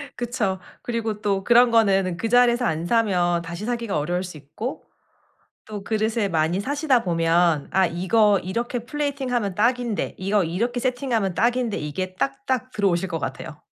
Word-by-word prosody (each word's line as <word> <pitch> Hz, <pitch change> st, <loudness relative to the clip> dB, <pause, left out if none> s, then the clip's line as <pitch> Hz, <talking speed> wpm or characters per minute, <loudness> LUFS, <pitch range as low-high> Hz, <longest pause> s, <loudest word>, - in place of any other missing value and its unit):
그쵸. 230 Hz, -6 st, -2 dB, 0.2 s
그리고 225 Hz, -3 st, -3 dB
또 195 Hz, -2 st, 0 dB
그런 240 Hz, +2 st, +5 dB
거는 195 Hz, -6 st, +3 dB
그 225 Hz, -, -2 dB
자리에서 245 Hz, 0 st, +4 dB
안 165 Hz, -3 st, -1 dB
사면 180 Hz, -6 st, +2 dB
다시 170 Hz, +5 st, -6 dB
사기가 235 Hz, -7 st, -2 dB
어려울 175 Hz, +5 st, -1 dB
수 180 Hz, -4 st, -8 dB
있고 150 Hz, -, -6 dB, 0.8 s
또 210 Hz, -2 st, -7 dB
그릇을 220 Hz, -1 st, 0 dB
많이 165 Hz, +4 st, +1 dB
사시다 280 Hz, -1 st, +1 dB
보면 165 Hz, -2 st, +2 dB
'아 190 Hz, -1 st, +4 dB
이거 200 Hz, +4 st, +3 dB
이렇게 235 Hz, +6 st, -3 dB
플레이팅하면 260 Hz, -7 st, -2 dB
딱인데. 235 Hz, 0 st, 0 dB
이거 195 Hz, 0 st, +1 dB
이렇게 235 Hz, +9 st, -2 dB
세팅하면 245 Hz, -6 st, -1 dB
딱인데.' 240 Hz, 0 st, +1 dB
이게 185 Hz, +5 st, -4 dB
딱딱 235 Hz, -, -2 dB
들어오실 190 Hz, -4 st, +1 dB
것 165 Hz, -, -3 dB
같아요. 145 Hz, -, -6 dB
210 Hz, 345 characters per minute, -23 LUFS, 180-240 Hz, 0.8 s, 그런